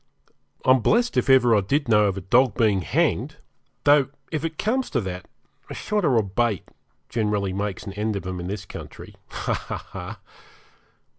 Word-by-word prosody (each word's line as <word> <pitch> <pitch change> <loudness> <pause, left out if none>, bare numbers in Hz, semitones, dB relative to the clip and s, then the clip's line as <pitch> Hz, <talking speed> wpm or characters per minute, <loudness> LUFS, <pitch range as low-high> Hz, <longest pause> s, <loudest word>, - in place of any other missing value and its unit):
I'm 130 0 +6
blessed 235 - +2
if - - +1
ever 125 -3 +6
I 105 - +4
did 140 +9 0
know 105 -2 +5
of 100 -1 0
a - - -4
dog 120 +4 +3
being 105 -5 +3
hanged, - - 0 0.5
though, 145 -2 +5 0.2
if 155 -2 -2
it 160 -1 -3
comes 250 +5 0
to 125 - 0
that, 90 -2 -6 0.4
a - - -6
shot 210 -1 -1
or 135 -7 +3
a 110 - +3
bait 105 +1 0 0.4
generally 105 -4 -1
makes 100 -1 -3
an 100 - -6
end 105 +1 -2
of 100 - -4
'em 90 0 -4
in 90 - -5
this 100 0 -5
country. - - -10 0.2
Ha, - - -2
ha! - - -6
110 Hz, 180 wpm, -24 LUFS, 100-135 Hz, 0.5 s, I'm